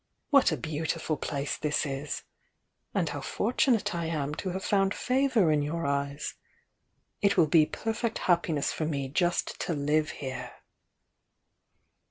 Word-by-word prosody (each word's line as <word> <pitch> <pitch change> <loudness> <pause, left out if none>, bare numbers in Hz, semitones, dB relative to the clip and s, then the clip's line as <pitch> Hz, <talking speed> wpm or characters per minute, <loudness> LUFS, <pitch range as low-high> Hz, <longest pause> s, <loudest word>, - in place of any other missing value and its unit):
What 275 -2 +6
a - - 0
beautiful 160 0 -2
place 140 0 -2
this 150 +1 0
is! 140 +1 -4 0.3
— - - -50
and - - +2
how - - -4
fortunate 245 -10 +1
I 170 -1 -2
am 150 -3 -2
to 185 - -3
have 190 +2 -4
found 195 -1 +2
favour 250 - +2
in 150 -1 +3
your 160 +3 -2
eyes! 140 +1 -1 0.9
It 200 -1 +3
will 165 - +7
be 155 0 +5
perfect 225 +1 -2
hcppiness 170 -5 +1
for 155 - -2
me 140 -4 -2
just 175 +5 0
to 170 - -1
live 150 +2 +1
here!" 130 -4 -6
160 Hz, 150 wpm, -29 LUFS, 145-190 Hz, 0.9 s, will